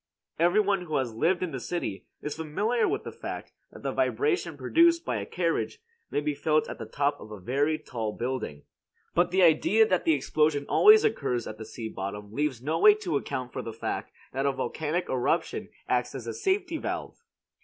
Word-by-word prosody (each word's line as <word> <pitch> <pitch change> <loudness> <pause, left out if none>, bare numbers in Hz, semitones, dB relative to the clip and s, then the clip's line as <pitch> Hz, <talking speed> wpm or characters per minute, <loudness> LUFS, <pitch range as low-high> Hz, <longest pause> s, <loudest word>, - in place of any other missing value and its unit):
Every 175 +5 +4
one 200 -2 +2
who 155 -3 -3
has 125 -4 0
lived 170 +11 +1
in 180 - -2
the 135 - -4
city 120 - -4 0.2
is 150 - -3
familiar 205 +10 0
with - - -1
the - - -6
fact - - -7 0.2
that - - -13
the - - -1
vibration 430 -4 0
produced 335 0 +4
by - - -1
a - - -4
carriage 455 - -1 0.3
may 145 - 0
be 150 0 -1
felt 155 +2 +1
at - - -7
the 115 - -6
top 145 +4 0
of - - -11
a 105 -2 -8
very 140 +10 +1
tall 115 -8 -4
building. 120 - -4 0.5
But 175 +1 +3
the 185 +1 +3
idea 180 +7 +5
that 185 -3 +1
the 160 - +4
explosion 145 +1 +1
always 430 +1 +7
occurs 125 - 0
at 110 - -7
the 110 - -6
sea 115 0 -6
bottom 105 +1 -6
leaves 140 -3 -1
no 160 +4 0
way 210 +2 +8
to 190 -7 -3
account 125 -2 -4
for - - -3
the 115 - -6
fact 115 - -4 0.2
that 135 +2 0
a - - +3
volcanic 155 +5 -2
eruption 125 -2 0 0.2
acts 125 +1 0
as 125 -4 -6
a 115 - -4
safety 380 -3 0
valve. - - -5
150 Hz, 205 wpm, -28 LUFS, 125-185 Hz, 0.5 s, way